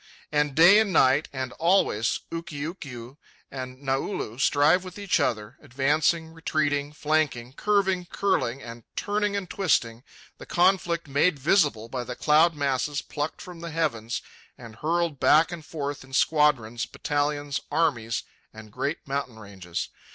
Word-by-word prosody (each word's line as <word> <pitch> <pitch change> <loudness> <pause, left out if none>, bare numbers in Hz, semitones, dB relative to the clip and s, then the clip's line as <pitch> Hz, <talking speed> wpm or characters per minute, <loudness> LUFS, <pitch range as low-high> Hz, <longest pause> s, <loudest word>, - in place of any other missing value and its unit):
And 150 -2 +1
day 175 +6 +8
and 220 -3 +1
night 140 -2 +4
and 130 -2 -4
always 165 - +2
Ukiukiu 145 -6 -6 0.3
and 130 0 -7
Naulu 135 - -2
strive 150 +6 +4
with 185 0 -9
each 200 -2 +1
other, 105 -2 -1
advancing, 150 +5 +1
retreating, 145 -3 -1
flanking, 150 -5 -1
curving, 190 0 +1
curling, 135 -11 -1
and 115 0 -9
turning 205 0 -1
and 200 -2 -3
twisting, 125 - 0 0.4
the - - -11
conflict 175 -2 +2
made 145 +4 +2
visible 145 - +2
by 125 +1 -4
the 125 0 -6
cloud 160 +4 +4
masses 145 0 -1
plucked 145 +1 -4
from 180 -2 -10
the 170 0 -6
heavens 145 -9 -2 0.3
and 115 -3 -12
hurled 165 0 -1
back 160 +4 +5
and 170 -2 -7
forth 145 -3 -4
in 130 0 -16
squadrons, 130 -6 +2
battalions, 145 -1 -2
armies, 135 -8 0 0.3
and 110 -1 -12
great 145 +8 -3
mountain 135 -4 -3
ranges. 95 -5 -6
145 Hz, 140 wpm, -26 LUFS, 130-165 Hz, 0.4 s, day